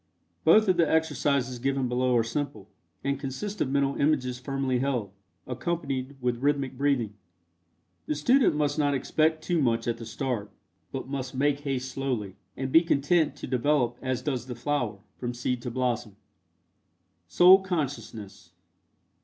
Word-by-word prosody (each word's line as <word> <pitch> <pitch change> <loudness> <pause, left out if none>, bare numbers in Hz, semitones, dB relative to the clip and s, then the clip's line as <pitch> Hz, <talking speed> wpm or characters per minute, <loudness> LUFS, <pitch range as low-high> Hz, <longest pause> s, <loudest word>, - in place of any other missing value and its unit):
Both 215 0 +6
of 185 -2 +3
the 170 -3 +3
exercises 140 -5 +1
given 135 0 0
below 125 0 +2
are 115 - +3
simple, 115 -4 -4 0.4
and 140 0 -1
consist 150 +10 -5
of 130 - +1
mental 140 0 +1
images 130 -4 +1
firmly 135 -1 -1
held, 125 -7 -1 0.3
accompanied 135 0 -3
with 125 -1 -1
rhythmic 140 -2 0
breathing. 130 -6 0 0.9
The 150 - 0
student 245 - +3
must 150 0 0
not 145 -1 +2
expect 155 +4 +1
too 175 -2 +1
much 115 -3 +1
at 115 -1 0
the 115 - -8
start, 115 -3 -3 0.4
but 135 -1 -5
must 135 -1 -4
make 140 +1 +2
haste 130 -3 -3
slowly, 125 -8 -3 0.2
and 130 0 -3
be 165 - +7
content 160 0 +2
to - - -7
develop 125 -1 +1
as 130 -1 -2
does 130 -5 -2
the 125 - -5
flower, 120 -5 -2 0.2
from 120 -1 -3
seed 125 0 -2
to 125 - -4
blossom. 120 -4 -2 1.1
SOUL 180 - +7
CONSCIOUSNESS. 145 - -5
135 Hz, 155 wpm, -27 LUFS, 125-145 Hz, 1.1 s, be